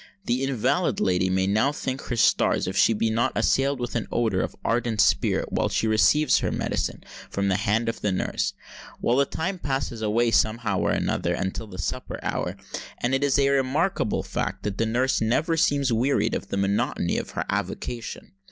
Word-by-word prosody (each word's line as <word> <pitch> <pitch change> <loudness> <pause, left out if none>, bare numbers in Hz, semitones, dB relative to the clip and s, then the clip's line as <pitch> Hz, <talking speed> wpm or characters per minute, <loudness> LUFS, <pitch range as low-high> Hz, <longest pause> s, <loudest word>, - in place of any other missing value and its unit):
The 125 -2 0
invalid 135 -5 0
lady 90 0 +2
may 95 0 +1
now 110 +8 +2
thank 135 -2 -4
her 120 - -3
stars 115 - +3
if 95 - -4
she 100 - +5
be 110 +1 0
not 120 +4 +1
assailed 135 0 +2
with 120 0 -4
an 115 - -2
odour 110 -6 +1
of - - -4
ardent 115 -2 0
spirit 100 -1 +2
while - - +1
she - - 0
receives 125 +7 +4
her - - -1
medicine - - -2 0.3
from 100 0 -1
the 95 - +2
hand 105 +4 +1
of 115 - -3
the 105 - 0
nurse. 95 - -1 0.5
Well, 120 - +1
the 140 0 +3
time 185 +3 -3
passes 135 -6 -3
away 115 +2 +2
somehow 115 +1 +1
or - - +1
another - - 0
until 95 +4 -3
the 95 -3 -10
supper 90 - -4
hour; - - -2 0.4
and 120 +2 -1
it 135 +1 +1
is 140 -1 +3
a 140 -1 +3
remarkable 140 - +1
fact, - - -3
that 100 -1 -3
the 115 - +2
nurse 125 +3 +1
never 140 +9 +1
seems 140 -6 +2
wearied 130 +5 +1
of - - -3
the - - -3
monotony 100 +1 0
of - - -6
her - - -1
avocation. 120 -1 -4
115 Hz, 195 wpm, -25 LUFS, 105-135 Hz, 0.5 s, she